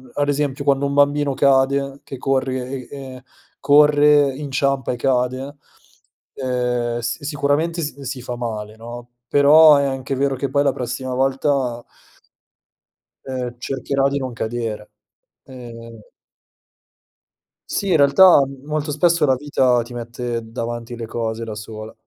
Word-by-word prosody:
ad 145 Hz, 0 st, 0 dB
esempio 145 Hz, -1 st, -1 dB
quando 140 Hz, 0 st, +2 dB
un 140 Hz, -, -3 dB
bambino 145 Hz, 0 st, +2 dB
cade 140 Hz, +1 st, +2 dB
che 135 Hz, -, -8 dB
corre 130 Hz, 0 st, -2 dB
e 135 Hz, -2 st, -9 dB
e 130 Hz, -, -16 dB, 0.4 s
corre, 145 Hz, 0 st, +5 dB
inciampa 140 Hz, -2 st, -1 dB
e 125 Hz, -, -4 dB
cade, 130 Hz, +3 st, -1 dB, 0.8 s
ehm, 125 Hz, -2 st, -2 dB
s 120 Hz, +5 st, -4 dB
sicuramente 145 Hz, +3 st, -1 dB
s 145 Hz, -3 st, -5 dB
si 130 Hz, -1 st, -5 dB
fa 125 Hz, 0 st, -5 dB
male, 110 Hz, -3 st, -5 dB
no. 120 Hz, +2 st, -10 dB, 0.2 s
Però 150 Hz, +1 st, +7 dB
è 140 Hz, -, +1 dB
anche 135 Hz, 0 st, -3 dB
vero 135 Hz, 0 st, 0 dB
che 140 Hz, +1 st, -3 dB
poi 140 Hz, +2 st, +2 dB
la 140 Hz, -2 st, +2 dB
prossima 125 Hz, +1 st, -4 dB
volta 135 Hz, -2 st, 0 dB, 1.4 s
ehm, 125 Hz, -2 st, -5 dB
cercherà 135 Hz, +2 st, -1 dB
di 140 Hz, -, -2 dB
non 130 Hz, -2 st, -5 dB
cadere. 110 Hz, -2 st, -4 dB, 0.6 s
Ehm 115 Hz, -3 st, -11 dB, 1.7 s
Sì, 200 Hz, -, -2 dB
in 170 Hz, -, +4 dB
realtà 145 Hz, +2 st, +6 dB
m 135 Hz, -1 st, -11 dB
molto 150 Hz, 0 st, -2 dB
spesso 165 Hz, +1 st, +2 dB
la 135 Hz, -2 st, +3 dB
vita 130 Hz, -3 st, +1 dB
ti 120 Hz, +1 st, -9 dB
mette 120 Hz, 0 st, -4 dB
davanti 120 Hz, 0 st, -5 dB
le 115 Hz, -1 st, -6 dB
cose 115 Hz, 0 st, -4 dB
da 115 Hz, -1 st, -6 dB
sola. 110 Hz, +1 st, -8 dB
135 Hz, 140 wpm, -20 LUFS, 120-140 Hz, 1.7 s, Però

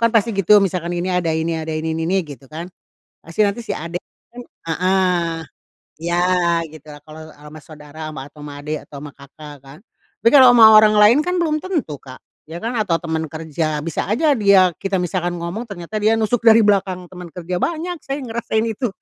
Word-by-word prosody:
kan 230 Hz, -, +4 dB
pasti 225 Hz, +1 st, +2 dB
gitu, 200 Hz, +2 st, +5 dB
misalkan 175 Hz, -2 st, -3 dB
ini 180 Hz, +1 st, -2 dB
ada 180 Hz, -2 st, 0 dB
ini 160 Hz, +1 st, -1 dB
ada 160 Hz, 0 st, -5 dB
ini 160 Hz, +1 st, -3 dB
ini 165 Hz, -, -2 dB
ini 190 Hz, +1 st, +2 dB
gitu 135 Hz, -3 st, -12 dB
kan, 165 Hz, +3 st, -7 dB, 0.6 s
pasti 165 Hz, +6 st, -2 dB
nanti 200 Hz, +4 st, -2 dB
si -, -, -3 dB
adek 170 Hz, +3 st, -5 dB, 0.3 s
kan 245 Hz, -, -9 dB, 0.3 s
heeh 180 Hz, -1 st, +1 dB, 0.6 s
ya 170 Hz, +2 st, -1 dB, 0.5 s
gitu 155 Hz, -1 st, -15 dB
lah, 145 Hz, -, -14 dB
kalau 155 Hz, +1 st, -12 dB
sama 150 Hz, +1 st, -13 dB
saudara 150 Hz, 0 st, -14 dB
sama 140 Hz, -, -8 dB
atau -, -, -20 dB
sama 145 Hz, -, -8 dB
adik 150 Hz, +1 st, -3 dB
atau 140 Hz, -, -11 dB
sama 145 Hz, -, -8 dB
kakak 145 Hz, +2 st, -12 dB
kan. 140 Hz, +4 st, -13 dB, 0.4 s
Tapi 230 Hz, -, +5 dB
kalau 255 Hz, -3 st, +8 dB
sama 220 Hz, -2 st, +8 dB
orang 215 Hz, 0 st, +5 dB
lain 210 Hz, +6 st, +6 dB
kan 360 Hz, 0 st, 0 dB
belum 310 Hz, -2 st, 0 dB
tentu 320 Hz, -, -3 dB
Kak, 130 Hz, -1 st, -12 dB, 0.3 s
ya 165 Hz, +1 st, -7 dB
kan 235 Hz, +2 st, -3 dB
atau 185 Hz, -6 st, +1 dB
temen 160 Hz, -2 st, -3 dB
kerja, 155 Hz, -1 st, -3 dB
bisa 165 Hz, -, -3 dB
aja 290 Hz, +7 st, +2 dB
dia 195 Hz, -4 st, +4 dB
kita 195 Hz, 0 st, -2 dB
misalkan 175 Hz, 0 st, -2 dB
ngomong 180 Hz, +8 st, -5 dB
ternyata 185 Hz, +1 st, -7 dB
dia 215 Hz, +1 st, +4 dB
nusuk 225 Hz, +2 st, 0 dB
dari 225 Hz, 0 st, +7 dB
belakang 190 Hz, -3 st, 0 dB
teman 180 Hz, -1 st, -10 dB
kerja, 180 Hz, 0 st, -5 dB
banyak 340 Hz, +2 st, -2 dB
saya 275 Hz, +1 st, -4 dB
yang 245 Hz, -, -8 dB
ngerasain 225 Hz, -1 st, -1 dB
itu. 245 Hz, +3 st, -2 dB
180 Hz, 205 wpm, -19 LUFS, 160-215 Hz, 0.6 s, kalau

